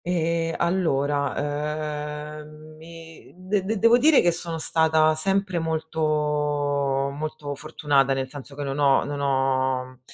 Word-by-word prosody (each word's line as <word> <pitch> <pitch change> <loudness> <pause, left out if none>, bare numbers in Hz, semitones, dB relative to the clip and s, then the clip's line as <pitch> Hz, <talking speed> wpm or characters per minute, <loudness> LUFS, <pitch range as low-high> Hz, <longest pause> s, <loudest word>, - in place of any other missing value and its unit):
Ehm, 165 -1 0
allora, 150 -1 -2
ehm, 155 +1 -14
mi 165 0 -13
de 185 +2 -1
de 215 +3 -2
devo 230 +4 +5
dire 300 +2 +6
che 175 - +3
sono 170 -1 -5
stata 160 -1 +3
sempre 190 +2 0
molto 160 0 -3 1.2
molto 150 -1 -5
fortunata, 140 -2 +1
nel 135 0 -2
senso 140 +1 -11
che 145 - -5
non 140 +1 -3
ho 140 -2 +4
non 145 0 -4
ho 130 -2 0
155 Hz, 130 wpm, -24 LUFS, 145-165 Hz, 1.2 s, dire